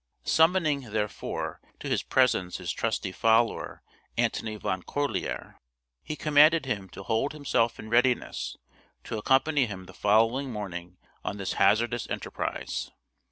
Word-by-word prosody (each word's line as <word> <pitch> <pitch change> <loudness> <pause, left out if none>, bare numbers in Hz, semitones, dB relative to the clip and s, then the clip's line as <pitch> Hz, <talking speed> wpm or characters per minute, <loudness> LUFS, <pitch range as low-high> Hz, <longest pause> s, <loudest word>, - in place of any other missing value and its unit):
Summoning, 160 -6 +3
therefore, 105 -1 -3 0.2
to - - -6
his - - +1
presence 105 -9 +2
his 90 -2 -3
trusty 105 -4 -2
follower, 115 +4 +1 0.3
Antony 110 -1 0
Van 95 -3 -2
Corlear, 145 +8 -3 0.4
he 155 - -5
commanded 155 +1 +5
him 100 -7 -3
to 95 - -9
hold 115 +8 0
himself 125 -6 +1
in 110 - -9
readiness 125 +2 +1 0.5
to 110 - -4
accompany 135 +3 +3
him 95 -3 -7
the - - -13
following 115 +6 +2
morning 90 -4 -6 0.3
on 100 - -3
this 100 -2 -3
his - - -4
hazardous 120 +2 +3
enterprise. - - -4
115 Hz, 135 wpm, -28 LUFS, 100-140 Hz, 0.5 s, commanded